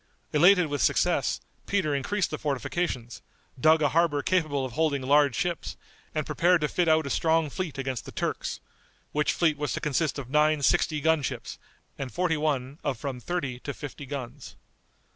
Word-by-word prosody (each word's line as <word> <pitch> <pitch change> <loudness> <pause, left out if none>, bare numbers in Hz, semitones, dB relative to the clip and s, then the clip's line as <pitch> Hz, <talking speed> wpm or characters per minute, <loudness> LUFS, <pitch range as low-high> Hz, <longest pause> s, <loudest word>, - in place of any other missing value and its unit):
Elated 180 +4 +6
with 145 -2 -2
success - - +2 0.3
Peter 190 -7 +1
increased 180 +8 -1
the 155 - -4
fortifications, 135 -3 -3 0.4
dug 155 +3 +5
a 145 - +4
harbor 160 -3 +2
capable 155 -7 +1
of 130 - -6
holding 145 -1 0
large 140 -1 +4
ships, 175 +4 -2 0.4
and 155 -1 -1
prepared 175 0 +3
to 150 - +2
fit 175 +4 0
out 160 -1 +4
a - - -3
strong 160 -2 +2
fleet 165 -5 -4
against 135 -2 -3
the - - -8
Turks; - - -3 0.5
which 150 0 +1
fleet 155 -4 +1
was 150 -2 -1
to - - -2
consist 150 +1 0
of 140 -4 -6
nine 150 +1 +2
sixty 150 +3 +2
gun 160 0 +3
ships, 125 - -5 0.4
and 135 -2 -4
forty 180 -2 +1
one 145 -2 -1
of 140 -4 -1
from 130 +1 -5
thirty 140 -4 -3
to 140 +1 -6
fifty 145 -1 -8
guns. 130 -4 -7
150 Hz, 180 wpm, -27 LUFS, 140-160 Hz, 0.5 s, Elated